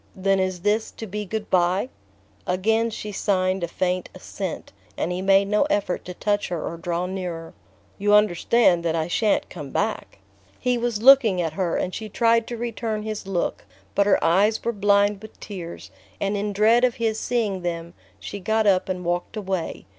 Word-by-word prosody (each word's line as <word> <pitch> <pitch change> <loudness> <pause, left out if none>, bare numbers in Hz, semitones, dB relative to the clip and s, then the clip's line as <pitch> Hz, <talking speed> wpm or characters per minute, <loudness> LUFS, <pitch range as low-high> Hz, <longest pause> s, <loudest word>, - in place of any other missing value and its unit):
"Then 195 0 +1
is 185 -2 -1
this 210 +3 +1
to 225 - -8
be 210 +1 -5
good 215 +2 -5
bye?" 185 +5 +2 0.6
Again 220 +5 +1
she 210 -1 -6
signed 190 -2 0
a - - 0
faint 180 +1 -2
assent, - - -6 0.2
and 175 - -1
he 180 +1 -2
made 195 +1 +4
no 210 +1 +2
effort 200 -3 -1
to 180 - -7
touch 205 +1 0
her 175 - -3
or 170 - -4
draw 170 +1 -2
nearer. 180 -3 -5 0.5
"You 205 +1 +4
understand 210 -2 +3
that 165 -1 0
I 160 -1 -1
sha'n't 210 +4 +1
come 150 -6 -7
back?" 215 - -2 0.4
He 250 0 0
was 235 -2 -2
looking 250 -8 +7
at 165 -3 -1
her, 175 -1 -1
and 185 - -2
she 220 -1 -5
tried 230 +1 +2
to 240 - -5
return 225 -2 -3
his 215 -2 -5
look, 180 - -2 0.3
but 200 0 +2
her 200 - +5
eyes 200 +6 +3
were 235 - 0
blind 205 0 +2
with 220 - -13
tears, 175 -5 -8 0.3
and 200 +1 -1
in 205 +1 -2
dread 220 +4 +4
of 250 -1 +3
his 225 -3 -1
seeing 215 -6 -1
them 170 -1 -4 0.3
she 205 - -7
got 220 +3 +1
up 190 -2 +3
and 180 -1 -3
walked 175 +5 -2
away. 190 -4 -3
200 Hz, 190 wpm, -24 LUFS, 180-220 Hz, 0.6 s, looking